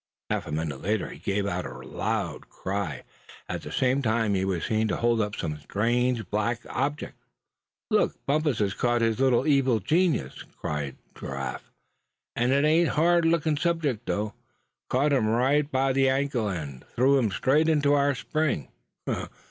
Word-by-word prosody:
Half - - -1
a - - -6
minute 75 -3 -3
later 105 +4 -1
he - - -10
gave 100 0 -1
a 90 -2 -1
loud 65 +1 -4
cry. 100 -4 -4 0.4
At - - -4
the - - -8
same 130 +1 +2
time 110 -3 +1
he 95 -1 +1
was 95 -4 -1
seen 110 0 +1
to - - 0
hold 120 -1 +2
up 105 -1 -2
some 75 -2 -4
strange 115 - 0
black 110 +3 0
object. 145 +3 -3 0.7
"Look! - - +2
Bumpus 150 -2 +1
has 100 -2 0
caught 120 +1 +1
his 115 0 +1
little 130 -3 +3
evil 135 -6 +3
genius!" 155 - +1 0.2
cried 75 -3 -3 0.2
Giraffe. 70 -1 -6 0.7
"And 120 +2 +1
ain't 140 +2 +3
it 160 +2 +4
a - - -2
hard 170 +2 +4
lookin' 165 -2 +2
subject 150 -8 -1
though. 105 0 -1 0.6
Caught 140 +3 +2
him 125 -6 +2
right 135 +6 +2
by 135 0 +2
the 135 0 +3
ankle, 135 -4 0
and 75 -9 -5
threw 135 +3 +4
him 115 -4 +1
straight 150 +10 +2
into 145 -2 +3
our 140 -1 +3
spring. 145 - -1
120 Hz, 165 wpm, -27 LUFS, 100-140 Hz, 0.7 s, it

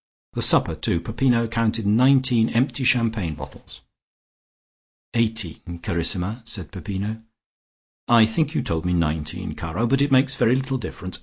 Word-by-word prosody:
The - - -3
supper - - +4
too. 85 - 0
Peppino 115 +6 0
counted 115 -1 -1
nineteen 125 +1 +3
empty 130 +3 0
champagne 115 -9 +1
bottles." - - -12 1.3
"Eighteen, 110 -7 0 0.2
carissima," 90 +7 -1
said 100 - -7
Peppino. 105 +3 -5 0.9
"I 115 -2 +6
think 155 +8 -1
you - - 0
told 80 -1 -2
me 90 0 -1
nineteen, 80 +1 -2
caro, 85 +8 -3
but 135 +3 +1
it 140 0 +1
makes 135 +1 +4
very 120 0 +2
little 135 0 -2
difference. 95 -5 -7
115 Hz, 140 wpm, -22 LUFS, 90-125 Hz, 1.3 s, I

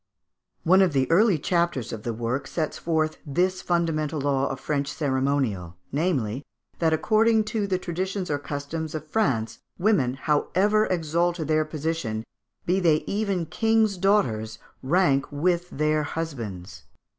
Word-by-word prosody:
One 185 +3 +5
of 185 -5 +3
the 135 -1 +2
early 200 +1 +5
chapters 170 - 0
of 110 - -5
the 120 - -3
work 120 +5 -3
sets 155 -3 -3
forth 160 -2 0
this 180 +6 0
fundamental 160 -3 0
law 140 -1 +1
of 135 - -4
French 140 0 -2
ceremonial, 130 - -1 0.2
namely, 140 - -1 0.4
that, 165 -2 +2
"according 220 +7 +3
to 210 -3 0
the 190 -1 +1
traditions 185 +1 -3
or 145 - 0
customs 150 +3 -5
of 155 - -5
France, 140 - 0 0.2
women, 175 - +2
however 190 +9 +2
exalted 170 -1 0
their 155 0 +3
position, 155 -8 -3 0.4
be 180 +2 +2
they 160 -4 +3
even 200 -4 -1
king's 220 +4 +2
daughters, 120 - +1 0.2
rank 140 -2 +2
with 175 +4 0
their 155 +1 +1
husbands." 110 - -5
155 Hz, 140 wpm, -25 LUFS, 135-180 Hz, 0.4 s, One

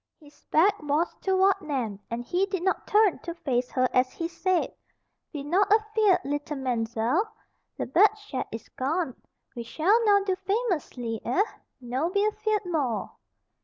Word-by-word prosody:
His 295 -2 -19
back 380 +5 +3
was 300 +3 0
toward 385 +1 +3
Nan 250 - -3
and 235 +1 -4
he 365 +8 +1
did 380 -3 -3
not 380 - 0
turn 420 -3 +4
to 340 -1 -6
face 250 -6 -1
her 255 0 +2
as 255 0 +3
he 330 - -3
said: 360 +2 0 0.6
"Be 290 -3 -5
not 370 +8 +2
afeared, 430 -2 +3
leetle 290 +1 -3
Man'zelle. 245 - 0 0.5
Le - - -2
bad 365 - +5
chat 415 -11 -5
is 225 -1 -7
gone. 280 +1 -2 0.4
We 240 - -4
shall 360 - +2
now 405 -1 +5
do 380 -1 0
famous 390 - -1
lee, 225 -3 -3
eh? 355 +12 +2 0.4
No 260 +6 -2
be 400 +2 +1
afeared 425 -1 0
more." 290 -10 -1
335 Hz, 165 wpm, -27 LUFS, 255-395 Hz, 0.6 s, bad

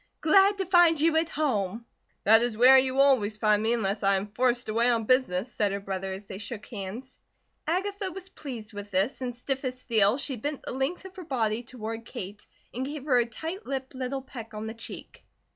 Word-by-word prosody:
"Glad 390 +5 +5
to 385 - -1
find 350 -3 +5
you 320 +1 +3
at 325 0 +1
home." 230 - -1 0.4
"That 225 +2 +6
is 240 -2 0
where 260 +3 +8
you 260 0 -1
will 275 - +6
always 220 -7 +3
find 210 -1 +3
me 225 +2 +2
unless 205 -3 -1
I 195 -1 +3
am 190 +1 -1
forced 245 +3 0
away 230 +3 +2
on 230 -2 +2
business," 245 -3 +2
said 205 -2 +1
her 200 - -2
brother 195 -1 -4
as 190 +2 -6
they 190 0 -8
shook 215 0 -7
hands. 220 +5 -8 0.5
Agatha 390 +3 -1
was 380 +1 -8
pleased 240 - -8
with 205 0 -7
this, 200 +8 0
and 245 -2 -3
stiff 265 +2 -3
as 255 -1 -3
steel, 220 -2 +2
she 275 -2 -3
bent 290 +5 -4
the - - -5
length 270 +9 -2
of 380 - -10
her 370 - -6
body 230 -7 -1
toward 225 -2 -6
Kate 205 -1 -8 0.3
and 250 - -3
gave 290 -1 -6
her 255 -5 +4
a 240 - +1
tight 325 - -6
lipped 265 -1 -4
little 260 +1 -4
peck 230 -5 -9
on 210 +1 -5
the 220 - -5
cheek. 225 - -10
245 Hz, 220 wpm, -27 LUFS, 215-275 Hz, 0.5 s, where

